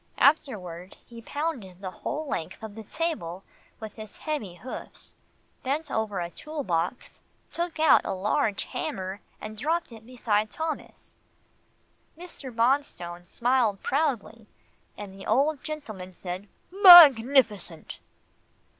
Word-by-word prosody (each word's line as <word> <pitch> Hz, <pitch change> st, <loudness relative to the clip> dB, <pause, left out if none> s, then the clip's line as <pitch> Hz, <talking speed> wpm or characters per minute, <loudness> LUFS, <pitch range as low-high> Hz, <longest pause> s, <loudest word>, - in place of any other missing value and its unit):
Afterward, 190 Hz, -, +1 dB
he 230 Hz, -1 st, -12 dB
pounded 240 Hz, -, -4 dB
the 190 Hz, -2 st, -6 dB
whole 310 Hz, +10 st, -5 dB
length 165 Hz, -, -5 dB
of 220 Hz, -2 st, -7 dB
the 220 Hz, +1 st, -9 dB
stable 205 Hz, -, -3 dB, 0.4 s
with 220 Hz, -1 st, -8 dB
his 215 Hz, -1 st, -10 dB
heavy 285 Hz, -, -4 dB
hoofs, 255 Hz, +7 st, -10 dB, 0.5 s
bent 290 Hz, +3 st, -2 dB
over 215 Hz, -3 st, -1 dB
a 170 Hz, 0 st, -4 dB
tool 305 Hz, -, -6 dB
box, 175 Hz, +4 st, -3 dB, 0.3 s
took 340 Hz, -1 st, -3 dB
out 315 Hz, -3 st, +6 dB
a -, -, -3 dB
large 200 Hz, +2 st, 0 dB
hammer, 190 Hz, +1 st, -5 dB, 0.2 s
and 215 Hz, 0 st, -8 dB
dropped 320 Hz, +7 st, -1 dB
it 225 Hz, -1 st, -12 dB
beside 220 Hz, -3 st, -1 dB
Thomas. 320 Hz, +5 st, -6 dB, 1.0 s
Mr. 340 Hz, -6 st, -9 dB
Bonstone 230 Hz, -8 st, 0 dB
smiled 235 Hz, +1 st, 0 dB
proudly, 235 Hz, -6 st, -1 dB, 0.5 s
and 205 Hz, -2 st, -8 dB
the 195 Hz, 0 st, -10 dB
old 280 Hz, +5 st, +1 dB
gentleman 215 Hz, -12 st, -7 dB
said, 180 Hz, +3 st, -7 dB, 0.2 s
"Magnificent!" 270 Hz, -, +7 dB
225 Hz, 120 wpm, -26 LUFS, 195-290 Hz, 1.0 s, Magnificent